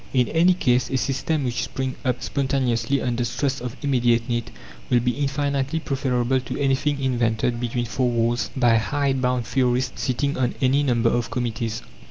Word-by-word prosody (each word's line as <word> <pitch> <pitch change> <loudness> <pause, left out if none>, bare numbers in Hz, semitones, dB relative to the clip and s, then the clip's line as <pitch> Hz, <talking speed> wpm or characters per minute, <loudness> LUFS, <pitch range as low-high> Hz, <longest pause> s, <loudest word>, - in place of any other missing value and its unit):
In 125 -2 +3
any 175 +3 +4
case, 125 -7 +1
a 130 - 0
system 135 +3 -1
which 125 -2 -1
springs 130 -1 -4
up 125 -1 -1
spontaneously, 130 -2 0
under 120 -1 0
stress 125 +3 -1
of 125 0 -5
immediate 120 -4 +2
need, 120 -2 -2 0.4
will 125 - +4
be 125 +1 +1
infinitely 140 +2 -1
preferable 130 -3 0
to 125 0 -6
anything 140 +1 +1
invented 120 -2 0
between 120 0 -2
four 125 +2 0
walls 120 0 0
by 120 -3 +4
hide 135 +3 0
bound 125 -1 0
theorists 125 0 0
sitting 140 +2 -1
on 125 -2 0
any 135 +1 +3
number 120 -4 +2
of 120 -1 -1
committees. 115 -2 -3
125 Hz, 170 wpm, -23 LUFS, 120-135 Hz, 0.4 s, any